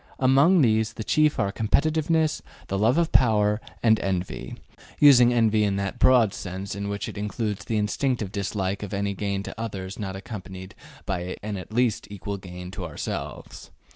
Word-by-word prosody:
Among 140 Hz, +7 st, +5 dB
these 110 Hz, -1 st, +2 dB
the 110 Hz, -, -6 dB
chief 155 Hz, +7 st, +2 dB
are 100 Hz, -2 st, 0 dB
competitiveness, 155 Hz, +8 st, +1 dB, 0.3 s
love 110 Hz, +8 st, +2 dB
of 170 Hz, -1 st, +1 dB
power, 105 Hz, -3 st, +3 dB, 0.2 s
and 110 Hz, -2 st, +5 dB
envy, 95 Hz, -1 st, -3 dB, 0.4 s
using 125 Hz, -5 st, +7 dB
envy 110 Hz, -3 st, +3 dB
in 100 Hz, -1 st, +1 dB
that 100 Hz, -1 st, -3 dB
broad 120 Hz, -6 st, +5 dB
sense 95 Hz, +1 st, -6 dB
in 100 Hz, +1 st, -4 dB
which 100 Hz, 0 st, -3 dB
it -, -, -7 dB
includes 105 Hz, 0 st, -3 dB
the 110 Hz, -, -1 dB
instinctive 105 Hz, 0 st, -1 dB
dislike 100 Hz, -1 st, -2 dB
of 105 Hz, -1 st, -5 dB
any 100 Hz, 0 st, -1 dB
gain 100 Hz, 0 st, -3 dB
to 110 Hz, -, -7 dB
others 95 Hz, -4 st, -5 dB
not 95 Hz, -2 st, -4 dB
accompanied 95 Hz, -2 st, -8 dB, 0.3 s
by 90 Hz, -1 st, -3 dB
an 105 Hz, -1 st, -3 dB
at 95 Hz, +2 st, -8 dB
least 120 Hz, -1 st, 0 dB
equal 100 Hz, 0 st, -5 dB
gain 90 Hz, -1 st, -9 dB
to 95 Hz, -, -6 dB
ourselves. 80 Hz, -4 st, -6 dB
105 Hz, 170 wpm, -25 LUFS, 95-120 Hz, 0.4 s, using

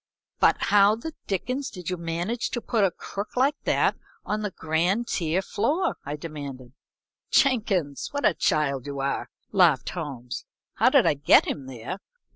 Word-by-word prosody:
"But -, -, +5 dB
how 205 Hz, +1 st, +5 dB
the 310 Hz, +8 st, -7 dB
dickens 255 Hz, +8 st, -2 dB
did 180 Hz, -1 st, -6 dB
you -, -, 0 dB
manage 175 Hz, +7 st, -2 dB
to 240 Hz, -, -2 dB
put 225 Hz, -2 st, 0 dB
a 195 Hz, -, +5 dB
crook 200 Hz, +6 st, -7 dB
like 270 Hz, +4 st, +4 dB
that -, -, +2 dB, 0.3 s
on 215 Hz, +1 st, -1 dB
the 210 Hz, -, -1 dB
grand 175 Hz, +7 st, 0 dB
tier 170 Hz, +2 st, 0 dB
floor?" 285 Hz, -, 0 dB
I 145 Hz, +2 st, -4 dB
demanded. 140 Hz, -5 st, -8 dB, 0.6 s
"Jenkins, 200 Hz, -, +2 dB
what 285 Hz, 0 st, -2 dB
a 205 Hz, -, +5 dB
child 140 Hz, -5 st, 0 dB
you 140 Hz, -1 st, -5 dB
are!" 135 Hz, 0 st, -2 dB, 0.2 s
laughed 170 Hz, -, +4 dB
Holmes. 135 Hz, -8 st, -6 dB, 0.3 s
"How -, -, +4 dB
did -, -, +5 dB
I -, -, +4 dB
get 145 Hz, 0 st, +5 dB
him 135 Hz, -3 st, -4 dB
there? 130 Hz, -, -6 dB
175 Hz, 165 wpm, -26 LUFS, 145-215 Hz, 0.6 s, But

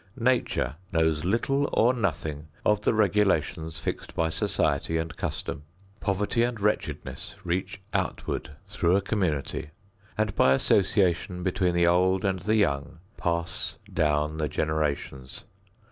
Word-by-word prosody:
Nature 120 Hz, -, +1 dB
knows 80 Hz, -2 st, +2 dB
little 135 Hz, +9 st, +1 dB
or 120 Hz, +3 st, +4 dB
nothing 80 Hz, -, -2 dB, 0.2 s
of 105 Hz, -1 st, +3 dB
the -, -, +2 dB
regulations 95 Hz, -7 st, +1 dB
fixed 80 Hz, -, -5 dB
by 80 Hz, 0 st, +1 dB
society 80 Hz, 0 st, +1 dB
and 80 Hz, -2 st, -3 dB
custom. -, -, -4 dB, 0.4 s
Poverty 100 Hz, +4 st, 0 dB
and 120 Hz, -1 st, 0 dB
wretchedness 105 Hz, +1 st, -2 dB
reach 90 Hz, +3 st, -2 dB
outward 75 Hz, +2 st, -2 dB
through 95 Hz, -3 st, +1 dB
a 100 Hz, -, +3 dB
community 80 Hz, -7 st, -1 dB, 0.5 s
and 110 Hz, -1 st, +1 dB
by 65 Hz, -, +5 dB
association 90 Hz, +1 st, +2 dB
between 90 Hz, -1 st, +1 dB
the 85 Hz, 0 st, +4 dB
old 90 Hz, +2 st, +3 dB
and 95 Hz, -1 st, +1 dB
the 105 Hz, +5 st, +1 dB
young 75 Hz, -8 st, +1 dB, 0.2 s
pass 85 Hz, -1 st, -2 dB, 0.2 s
down 75 Hz, 0 st, +1 dB
the 75 Hz, -, 0 dB
generations. 75 Hz, -4 st, -2 dB
90 Hz, 130 wpm, -27 LUFS, 80-105 Hz, 0.5 s, by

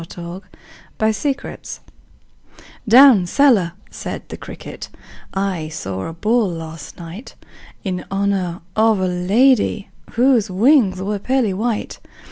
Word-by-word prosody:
The 170 Hz, +2 st, -8 dB, 0.6 s
Potato's 220 Hz, +6 st, +1 dB
Dance -, -, -8 dB, 1.1 s
"Down 235 Hz, -5 st, +7 dB
cellar," 210 Hz, -8 st, +3 dB, 0.2 s
said -, -, -6 dB
the -, -, -6 dB
cricket, -, -, -9 dB, 0.5 s
"I 190 Hz, -5 st, -2 dB
saw 95 Hz, -10 st, -5 dB
a 165 Hz, -, -6 dB
ball 215 Hz, +5 st, +1 dB
last 165 Hz, -3 st, -8 dB
night 175 Hz, +7 st, -10 dB, 0.5 s
In 185 Hz, -2 st, -3 dB
honor 195 Hz, -3 st, -1 dB
of 220 Hz, -1 st, +3 dB
a 185 Hz, -, +1 dB
lady 205 Hz, +4 st, +2 dB, 0.2 s
Whose 240 Hz, -3 st, +3 dB
wings 195 Hz, -2 st, +3 dB
were 205 Hz, +1 st, -2 dB
pearly 245 Hz, -2 st, 0 dB
white. 220 Hz, +3 st, -3 dB
200 Hz, 115 wpm, -19 LUFS, 180-230 Hz, 1.1 s, Down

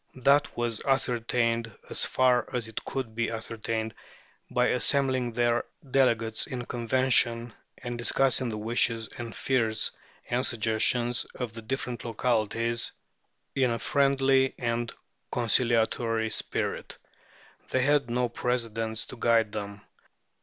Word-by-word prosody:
That 140 Hz, +2 st, +2 dB
was 120 Hz, -2 st, -1 dB
ascertained, 120 Hz, -3 st, 0 dB, 0.2 s
as -, -, +3 dB
far 125 Hz, -2 st, +2 dB
as 125 Hz, -3 st, -2 dB
it 110 Hz, -, -6 dB
could 130 Hz, -5 st, -4 dB
be 115 Hz, 0 st, -1 dB
ascertained, 110 Hz, 0 st, -3 dB, 0.6 s
by 125 Hz, 0 st, +2 dB
assembling 130 Hz, -1 st, +2 dB
their 120 Hz, 0 st, +2 dB, 0.3 s
delegates 115 Hz, -4 st, +2 dB
in 125 Hz, -2 st, -5 dB
convention, 120 Hz, -1 st, +2 dB, 0.2 s
and 120 Hz, -1 st, -6 dB
discussing 130 Hz, +1 st, +2 dB
the 110 Hz, -, -4 dB
wishes 115 Hz, 0 st, 0 dB
and 115 Hz, -2 st, -6 dB
fears 115 Hz, -4 st, +1 dB, 0.4 s
and 125 Hz, +1 st, 0 dB
suggestions 120 Hz, +2 st, +1 dB
of 120 Hz, -3 st, -4 dB
the 115 Hz, -, -8 dB
different 120 Hz, 0 st, -4 dB
localities 115 Hz, 0 st, 0 dB, 0.6 s
in 130 Hz, -2 st, +2 dB
a 115 Hz, -, -1 dB
friendly 135 Hz, +1 st, +2 dB
and 120 Hz, -1 st, -2 dB, 0.4 s
conciliatory 115 Hz, -1 st, +2 dB
spirit. -, -, -2 dB, 0.7 s
They 130 Hz, -, +1 dB
had 145 Hz, -2 st, +2 dB
no 125 Hz, +1 st, +1 dB
precedents 115 Hz, -2 st, -2 dB
to 130 Hz, -, -10 dB
guide 115 Hz, -2 st, +2 dB
them. 100 Hz, -1 st, -6 dB
120 Hz, 120 wpm, -28 LUFS, 115-125 Hz, 0.7 s, as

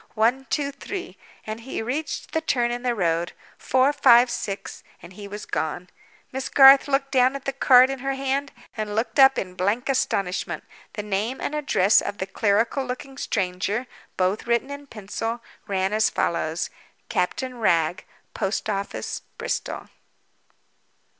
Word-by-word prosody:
One, 245 Hz, +5 st, +2 dB
two, 285 Hz, -2 st, 0 dB
three—and 280 Hz, -, -8 dB
he 230 Hz, -1 st, -5 dB
reached 285 Hz, +7 st, -4 dB
the 320 Hz, -, 0 dB
turn 240 Hz, -6 st, +1 dB
in 240 Hz, 0 st, -3 dB
the 245 Hz, -1 st, 0 dB
road. 170 Hz, -3 st, 0 dB, 0.3 s
Four, 260 Hz, +3 st, +2 dB
five, 245 Hz, -3 st, +6 dB
six—and 195 Hz, -2 st, -7 dB
he 200 Hz, +1 st, -9 dB
was 210 Hz, +1 st, -7 dB
gone. 165 Hz, +3 st, -3 dB, 0.4 s
Miss 265 Hz, 0 st, -4 dB
Garth 270 Hz, 0 st, +8 dB
looked 275 Hz, -1 st, 0 dB
down 260 Hz, 0 st, +3 dB
at 275 Hz, -, -7 dB
the 275 Hz, -, -1 dB
card 260 Hz, -1 st, +6 dB
in 270 Hz, -, -5 dB
her 270 Hz, +1 st, -2 dB
hand, 275 Hz, +1 st, -1 dB, 0.2 s
and 215 Hz, -2 st, -3 dB
looked 225 Hz, +2 st, -1 dB
up 270 Hz, 0 st, +8 dB
again 185 Hz, -, -2 dB
in -, -, -15 dB
blank 210 Hz, +9 st, 0 dB
astonishment. 195 Hz, -8 st, -1 dB, 0.3 s
The 210 Hz, -, -4 dB
name 210 Hz, +5 st, -2 dB
and -, -, -3 dB
address 275 Hz, -9 st, +3 dB
of 205 Hz, -, -5 dB
the 190 Hz, -, -2 dB
clerical 225 Hz, +7 st, +1 dB
looking 260 Hz, +2 st, -6 dB
stranger 200 Hz, 0 st, -2 dB, 0.3 s
(both 190 Hz, +5 st, 0 dB
written 235 Hz, +4 st, +1 dB
in 285 Hz, 0 st, -8 dB
pencil) 225 Hz, +1 st, -4 dB, 0.3 s
ran 190 Hz, 0 st, 0 dB
as 215 Hz, 0 st, +3 dB
follows: 165 Hz, 0 st, -1 dB, 0.4 s
_Captain 245 Hz, +7 st, -2 dB
Wragge. 170 Hz, -4 st, +2 dB, 0.3 s
Post 205 Hz, +2 st, -2 dB
office, 200 Hz, 0 st, -4 dB, 0.2 s
Bristol. 470 Hz, +2 st, -4 dB
235 Hz, 155 wpm, -24 LUFS, 200-270 Hz, 0.4 s, Garth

